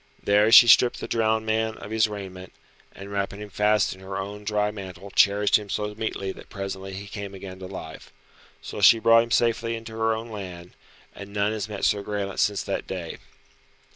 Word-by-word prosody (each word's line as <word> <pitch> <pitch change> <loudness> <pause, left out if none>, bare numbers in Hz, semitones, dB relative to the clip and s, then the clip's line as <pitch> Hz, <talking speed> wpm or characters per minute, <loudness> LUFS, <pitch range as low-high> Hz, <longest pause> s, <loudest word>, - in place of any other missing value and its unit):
There 105 +2 +3
she 120 0 +10
stripped 120 +1 +5
the - - -5
drowned 110 -1 +1
man 110 0 -1
of 105 - -10
his 110 0 +3
raiment, 95 -3 -8 0.4
and 100 +1 -11
wrapping 100 0 -3
him 105 -1 -9
fast 105 0 +2
in 95 - -15
her 95 0 -6
own 100 +2 -6
dry 105 0 0
mantle 95 -1 -9
cherished 100 +1 +4
him 105 -1 -10
so 105 +1 -2
meetly 105 -3 -4
that - - -13
presently 95 -1 -6
he 100 +2 -7
came 100 -1 -7
again 95 -1 -9
to 95 - -7
life. 80 -4 -9 0.5
So - - -6
she 115 - +8
brought 115 +1 +5
him 115 - -4
safely 115 0 +1
into 115 0 -8
her 110 0 0
own 115 +1 -7
land, 90 -4 -8 0.4
and 100 0 -10
none 100 +1 0
has 110 -1 -4
met 100 -2 -3
Sir 100 - +2
Graelent 100 -1 -4
since 105 -2 +1
that - - -4
day. 90 -4 -6
105 Hz, 200 wpm, -25 LUFS, 95-110 Hz, 0.5 s, she